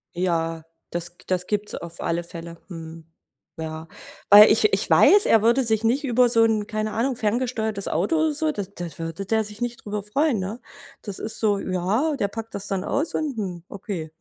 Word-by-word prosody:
Ja, 165 -2 -1 0.3
das 175 0 -4
das 180 -1 -1
gibt's 210 0 -2
auf 170 0 -8
alle 170 +1 -1
Fälle. 170 0 -8
Mhm. 165 -2 -9 0.5
Ja. 160 0 -6 0.4
Weil 210 +2 +10
ich 420 - +3
ich - - 0
weiß, 410 +1 +6
er 225 - +5
würde 235 +4 +3
sich 220 -2 +1
nicht 250 +6 +1
über 250 -1 +3
so 230 -1 +4
'n- 220 -2 +2
keine 215 -1 -2
Ahnung- 245 +3 0
ferngesteuertes 220 -2 -1
Auto 185 - 0
oder 315 -1 +2
so 310 +1 0
d 205 - -4
da 175 - -5
würde 165 +4 -5
der 220 +2 +1
sich 210 +2 -9
nicht 240 0 -4
drüber 205 -1 -3
freuen, 275 +3 +1
ne? 200 +6 -4 0.4
Das 205 -3 -7
ist 220 0 -5
so 205 -3 +2
ja, 200 - 0
der 200 - 0
packt 225 +2 -7
das 200 +1 -5
dann 195 -1 -2
aus 295 +4 -1
und: 295 -6 -2
„Hm, 180 -5 -4
okay.“ 185 -6 -6
210 Hz, 200 wpm, -24 LUFS, 175-235 Hz, 0.5 s, Weil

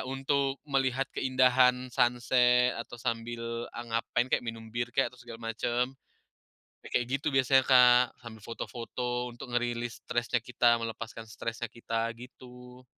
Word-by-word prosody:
untuk 135 +1 -1
melihat 135 -1 +1
keindahan 130 -1 +3
sunset, 125 0 +3
atau 115 - -7
sambil 115 0 -4
a - - -5
ngapain 120 +2 0
kek, - - +4
minum 115 -1 -6
bir 120 +1 -3
kek, 135 - +2
atau 125 - -19
segala 115 -1 -7
macam. 120 +3 -1 0.9
Ya - - -9
kayak 120 - -5
gitu 145 - -4
biasanya, 130 0 +4
Kak. 125 -1 +7 0.2
Sambil 110 -2 -10
foto-foto, 125 +1 -4
untuk 120 +2 -10
ngerilis 120 0 -2
stresnya 120 0 0
kita, 120 -1 +3
melepaskan 115 0 -6
stresnya 115 +1 -4
kita, 115 0 -2
gitu. 125 +1 -13
120 Hz, 140 wpm, -29 LUFS, 115-125 Hz, 0.9 s, Kak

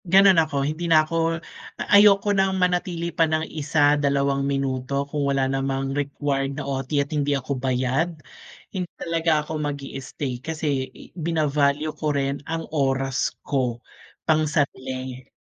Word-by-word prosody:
Ganon 190 -1 +6
ako, 145 -3 -1
hindi 160 +4 -2
na 155 -1 +6
ako 165 +1 0 0.4
ayoko 205 0 +5
ng 195 -1 +2
manatili 180 -2 0
pa 165 -1 +2
ng 155 0 0
1 145 -1 +2
2 140 -1 +1
minuto 135 0 -1
kung 145 -1 -1
wala 135 -1 +2
namang 135 0 -1
required 140 -1 -2
na 145 - -4
OT 135 -1 -3
at 140 +1 0
hindi 145 -1 +1
ako 135 0 -4
bayad. 130 +6 0 0.6
Hindi 180 -3 -3
talaga 165 -2 +1
ako 155 0 -4
mag-i-stay 135 -3 -4
kasi, 150 -4 -2 0.2
bina-value 150 -2 +1
ko 150 -2 -1
rin 140 0 -1
ang 165 0 -2
oras 135 -2 +1 0.2
ko, 125 -4 0 0.5
pangsarili. 130 -5 -1
145 Hz, 135 wpm, -24 LUFS, 135-160 Hz, 0.6 s, Ganon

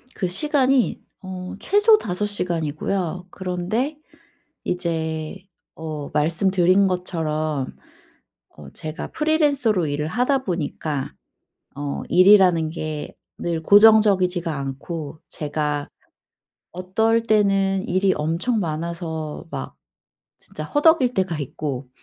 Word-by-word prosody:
그 185 - -1
시간이 270 - +2 0.2
어 185 0 -7
최소 415 +2 +5
5 205 - -2
시간이고요. 180 -1 -2
그런데 190 - -2 0.7
이제 160 -3 -2 0.4
어 155 -3 -6
말씀드린 185 +4 +3
것처럼 155 -6 -2 0.8
어 75 -2 -12
제가 155 0 -6
프리랜서로 285 - +2
일을 150 +1 -2
하다 260 - +1
보니까 155 -5 -3 0.6
어 145 0 -4
일이라는 180 -4 +5
게 155 -2 -5 0.3
늘 165 -2 -2
고정적이지가 200 -5 +5
않고 145 +3 -6
제가 150 -1 -3 0.9
어떨 220 +6 +1
때는 195 -3 +2
일이 190 +1 +2
엄청 170 +10 0
많아서 160 -2 -4
막 - - -6 0.6
진짜 - - -8
허덕일 290 -4 +3
때가 185 -7 -1
있고 140 -2 -5
180 Hz, 215 characters per minute, -22 LUFS, 155-205 Hz, 0.9 s, 최소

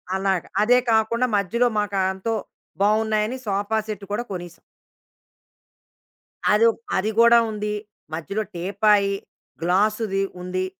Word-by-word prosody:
అలాగా. 190 -2 0 0.2
అదే 245 +3 +5
కాకుండా 225 +3 +2
మధ్యలో 235 +5 +1
మాకు 205 -1 -2 0.2
ఎంతో 205 +4 -2 0.5
బాగున్నాయని 215 +3 +1
సోఫా 205 +2 -1
సెట్ 210 -2 -5
కూడా 210 +4 -1
కొనేసాం. 175 -2 -7 1.9
అది 215 +2 +5
ఒక్ - - -15 0.2
అది 210 +3 0
కూడా 235 0 +7
ఉంది. 210 0 -3 0.4
మధ్యలో 195 +7 -3
టీపాయి. 200 +3 +2 0.5
గ్లాసుది 195 +3 +1 0.2
ఉంది. 185 +1 -2
210 Hz, 110 wpm, -23 LUFS, 190-220 Hz, 1.9 s, కూడా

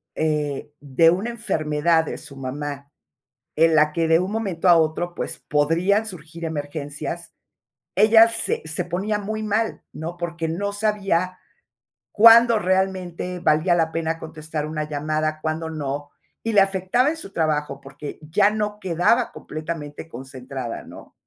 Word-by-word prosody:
eh, 150 -2 -2
de 145 +3 +4
una 195 +7 -1
enfermedad 165 -8 +1
de - - -5
su 140 - -11
mamá, 140 +1 -6 0.6
en 165 +1 +4
la 155 -1 +4
que, 165 0 +1
de 165 0 +5
un 185 +2 -2
momento 195 -5 0
a 170 - +8
otro, 165 +2 0
pues, - - -4
podrían 170 +8 +1
surgir 170 -4 -7
emergencias, 150 +1 -5 0.6
ella 225 +1 +7
se 230 - 0
se 160 +3 -1
ponía 190 +5 -1
muy 215 +1 -4
mal, 215 +1 -1
¿no?, 165 +3 -6
porque 170 -1 -3
no 200 +5 -2
sabía 195 -4 0 0.8
cuándo 230 +1 +8
realmente 185 -2 -1
valía 170 +1 +3
la 165 -1 +1
pena 165 0 -2
contestar 155 -1 -5
una 155 0 -3
llamada, 155 +1 -2
cuándo 160 +1 -2
no, 145 -2 -4 0.3
y 225 - -2
le 205 - +7
afectaba 195 +7 +2
en 320 - -3
su 195 -11 -10
trabajo 150 -3 -1
porque 140 +2 -9
ya 200 +7 +3
no 210 -1 -3
quedaba 190 +6 +1
completamente 155 -1 -6
concentrada, 130 -3 -7
¿no? - - -13
165 Hz, 145 wpm, -23 LUFS, 150-195 Hz, 0.8 s, a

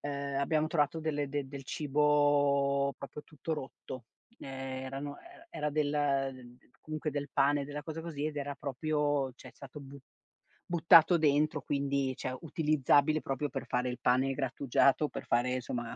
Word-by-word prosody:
ehm, 140 -1 -3
abbiam 155 +2 +1
trovato 150 0 +1
delle 150 -2 -1
del 145 0 -3
del 135 -1 -8
cibo 145 -1 +2
proprio 140 +2 -8
tutto 155 +1 -5
rotto. 130 -4 -7 0.3
Ehm, - - -10 0.4
erano 140 +2 -6
era 345 -1 -16
era 150 0 -2
del, 145 0 0
ehm, 135 -4 -1 0.2
comunque 155 0 -4
del 145 0 -3
pane, 140 +1 +2
della 145 0 -6
cosa 160 +2 -6
così 155 -3 -5
ed 155 -1 -3
era 140 0 -3
proprio 145 0 -1
cioè 130 - -13
è - - -11
stato 140 +3 -11
bu 140 0 -11 0.7
buttato 170 0 +6
dentro 150 0 +2
quindi 140 -2 -1
cioè 130 +1 -4
utilizzabile 155 -1 +2
proprio 135 +2 -2
per 135 - -5
fare 125 +1 0
il 125 0 -5
pane 130 +2 +2
grattugiato, 135 +2 +2
per - - -7
fare 125 +1 +1
somma 120 -1 -4
145 Hz, 160 wpm, -31 LUFS, 135-150 Hz, 0.7 s, buttato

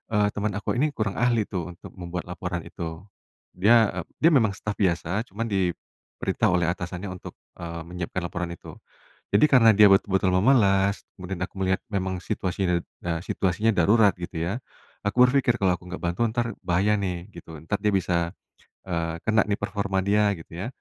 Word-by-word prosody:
eee, 105 0 +4
teman 105 -1 -2
aku 105 +4 -2
ini 150 0 +1
kurang 110 -3 -2
ahli 120 -3 +3
tuh 90 -3 -5
untuk - - -12
membuat 90 -1 -6
laporan 90 0 -5
itu, 80 +2 -7 0.5
dia, 110 +3 +5
eee, - - -12 0.2
dia 165 +2 +6
memang 110 -8 +4
staf 105 +1 -5
biasa 95 +3 0
cuman 110 +4 -3
diperintah 95 -4 -2
oleh 90 -2 +2
atasannya 90 +2 -4
untuk, 90 - -10 0.2
eee, 85 -1 -6
menyiapkan 90 +1 -4
laporan 90 0 -3
itu, - - -11 0.6
jadi 100 +8 +6
karena 125 -6 +6
dia 105 0 +7
betul-betul 95 -1 +3
memelas 100 -3 +3
kemudian 90 0 -5
aku - - -32
melihat 95 0 +1
memang 95 -2 -2
situasinya, 95 -3 -1 0.3
eee, 85 -1 -1
situasinya 100 +5 +1
darurat 100 +3 +5
gitu 85 -1 -7
ya, 100 +8 -2 0.5
aku 125 +5 +5
berpikir 125 -3 +2
kalau 90 -2 +3
aku 90 - -16
nggak 90 +1 -7
bantu 85 +7 0
entar 115 0 -1
bahaya 95 +4 +2
nih 90 0 -4
gitu 85 -3 -11
entar 100 +5 -2
dia 105 0 0
bisa, 85 -1 0 0.5
eee, 85 -1 -2
kena 110 0 +4
nih 100 -1 -1
performa 100 -2 -1
dia 105 +1 +3
gitu 80 +1 -12
ya, 95 +6 -4
95 Hz, 175 wpm, -25 LUFS, 90-105 Hz, 0.6 s, dia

